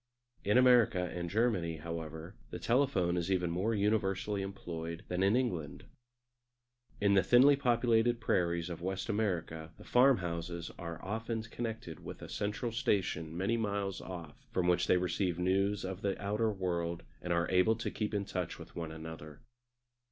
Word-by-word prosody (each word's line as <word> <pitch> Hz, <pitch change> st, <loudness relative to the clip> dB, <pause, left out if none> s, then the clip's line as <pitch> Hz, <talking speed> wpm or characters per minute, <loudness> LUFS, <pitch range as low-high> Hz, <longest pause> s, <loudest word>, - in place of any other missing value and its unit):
In 105 Hz, +4 st, +3 dB
America 115 Hz, -8 st, +5 dB
and 85 Hz, -1 st, -3 dB
Germany, 95 Hz, -6 st, +1 dB
however, 80 Hz, +2 st, -6 dB, 0.2 s
the -, -, -5 dB
telephone 115 Hz, -9 st, +2 dB
is 85 Hz, +1 st, -1 dB
even 90 Hz, -2 st, +1 dB
more 100 Hz, +7 st, 0 dB
universally 100 Hz, -1 st, +1 dB
employed 85 Hz, -4 st, -5 dB
than 90 Hz, +1 st, -1 dB
in 100 Hz, +3 st, +4 dB
England. 90 Hz, -, -1 dB, 1.2 s
In 100 Hz, -1 st, +3 dB
the 95 Hz, -, +6 dB
thinly 125 Hz, +9 st, +6 dB
populated 120 Hz, -2 st, +2 dB
prairies 85 Hz, -5 st, 0 dB
of 85 Hz, -, -6 dB
West 95 Hz, +4 st, -3 dB
America 85 Hz, -7 st, -1 dB
the -, -, -13 dB
farm 130 Hz, +1 st, +5 dB
houses 85 Hz, -1 st, -4 dB
are 85 Hz, -2 st, -5 dB
often 110 Hz, +2 st, -2 dB
connected 115 Hz, -7 st, -6 dB
with -, -, -8 dB
a -, -, -8 dB
central 105 Hz, +3 st, -2 dB
station 95 Hz, -, 0 dB
many 100 Hz, +6 st, +1 dB
miles 100 Hz, -3 st, -2 dB
off, 85 Hz, -5 st, -9 dB
from 90 Hz, -1 st, +1 dB
which 90 Hz, -1 st, +3 dB
they 90 Hz, -, +5 dB
receive 90 Hz, 0 st, 0 dB
news 95 Hz, +3 st, +1 dB
of 95 Hz, +1 st, -5 dB
the 100 Hz, -1 st, -1 dB
outer 105 Hz, +2 st, 0 dB
world 85 Hz, -3 st, -2 dB, 0.2 s
and 90 Hz, -, -4 dB
are 85 Hz, 0 st, +2 dB
able 95 Hz, +5 st, +4 dB
to 115 Hz, -, -3 dB
keep 105 Hz, -1 st, -2 dB
in 100 Hz, -1 st, 0 dB
touch 90 Hz, -3 st, -3 dB
with -, -, -12 dB
one 80 Hz, -2 st, -4 dB
another. 80 Hz, -2 st, -9 dB
95 Hz, 165 wpm, -33 LUFS, 85-110 Hz, 1.2 s, the